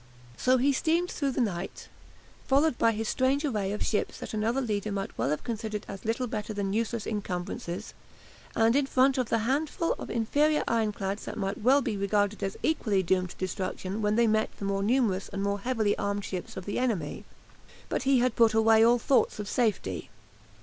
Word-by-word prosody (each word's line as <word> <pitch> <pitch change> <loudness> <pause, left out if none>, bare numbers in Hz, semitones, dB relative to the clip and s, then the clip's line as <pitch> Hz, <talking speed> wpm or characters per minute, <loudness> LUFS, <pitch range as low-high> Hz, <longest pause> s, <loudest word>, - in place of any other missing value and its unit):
So 255 - +3
he 275 +3 +3
steamed 335 +6 +1
through 280 -2 -1
the - - 0
night, 190 -5 -3 0.6
followed 280 +1 +3
by 230 - +4
his 220 0 -3
strange 270 +5 +1
array 210 -8 -1
of 210 - -2
ships 210 - -1
that - - -7
another 220 +4 0
leader 215 -4 -2
might 195 -1 -4
well - - 0
have 150 - -1
considered 220 -3 -4
as 195 +2 -8
little 230 +3 0
better 215 -3 -4
than 200 -1 -1
useless 230 0 -1
encumbrances, 180 -2 -4 0.6
and 225 +2 +4
in 280 -1 +2
front 260 0 +3
the 230 - +1
handful 290 - 0
of - - -7
inferior 295 +7 +2
ironclads 210 -3 -1
that - - -6
might 195 -1 -2
well 265 +5 +4
be 220 -4 -2
regarded 205 +1 0
as 195 0 -3
equally 210 -11 +1
doomed 185 0 +1
to - - -12
destruction 185 +2 -3
when 210 0 +1
they 235 +1 +4
met 220 0 +2
the 200 - -5
more 195 0 0
numerous 210 -3 +1
and 195 0 -4
more 200 0 0
heavily 220 -2 0
armed 200 0 -2
ships 185 -1 -6
of 185 - -6
the 205 - -2
enemy. 210 -13 -2 0.6
But - - -1
he 270 0 +3
had 245 -1 +2
put 225 -2 +4
away 220 0 +5
all 235 +1 +5
thoughts 255 +3 +2
of 210 -1 -5
safety. 205 - -1
220 Hz, 195 wpm, -28 LUFS, 200-250 Hz, 0.6 s, away